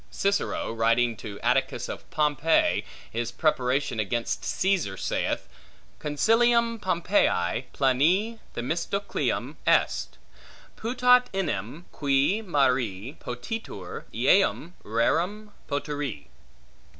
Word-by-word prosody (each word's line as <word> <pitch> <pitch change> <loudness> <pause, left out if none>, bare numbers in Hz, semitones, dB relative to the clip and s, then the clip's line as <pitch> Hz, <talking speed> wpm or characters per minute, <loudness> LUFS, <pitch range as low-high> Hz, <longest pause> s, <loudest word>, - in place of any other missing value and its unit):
Cicero, 200 - -1
writing 115 +1 +2
to 100 -1 -8
Atticus - - +1
of - - -8
Pompey 150 - +2 0.3
his 120 +1 -2
preparation 130 -2 0
against 115 +3 -1
Caesar, 180 - 0
saith, - - -2 0.5
Consilium 230 +9 +2
Pompeii 170 - +1
plane 170 - +2 0.2
Themistocleum 170 +10 -2
est; - - +2 0.6
putat 250 +1 +4
enim, 150 - -3
qui 145 +8 +1
mari 130 - 0
potitur, 120 - -6
eum 170 - +2
rerum 175 - 0 0.2
potiri. 145 - -3
145 Hz, 85 wpm, -26 LUFS, 120-195 Hz, 0.6 s, putat